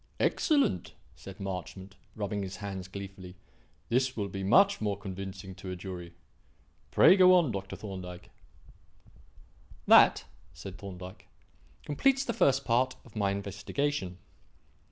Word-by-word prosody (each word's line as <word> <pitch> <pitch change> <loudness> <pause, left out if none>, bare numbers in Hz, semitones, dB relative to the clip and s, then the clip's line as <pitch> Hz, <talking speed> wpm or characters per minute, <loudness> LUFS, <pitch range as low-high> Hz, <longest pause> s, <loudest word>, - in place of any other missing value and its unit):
"Excellent!" 280 - +1 0.2
said 95 0 -11
Marchmont, 95 0 -6 0.2
rubbing 105 -1 -3
his 95 -1 -5
hands 95 -3 -6
gleefully; 95 -1 -9 0.5
"this 130 +1 +1
will 100 -2 -2
be 95 +1 -5
much 195 - +4
more 105 -2 -1
convincing 95 -1 -7
to 95 - -9
a 90 - -4
jury. 90 -2 -8 0.7
Pray 185 - +7
go 185 -1 +7
on, 170 -8 +3
Dr. 95 -1 -5
Thorndyke." 90 -4 -8 1.5
"That," - - +6 0.3
said 95 +5 -9
Thorndyke, 95 -1 -9 0.6
"completes 270 - +2
the 235 - -1
first 135 -6 +2
part 130 +2 +2
of 115 - -18
my 100 -2 +1
investigation. 100 +2 -3
100 Hz, 125 wpm, -30 LUFS, 95-125 Hz, 1.5 s, Pray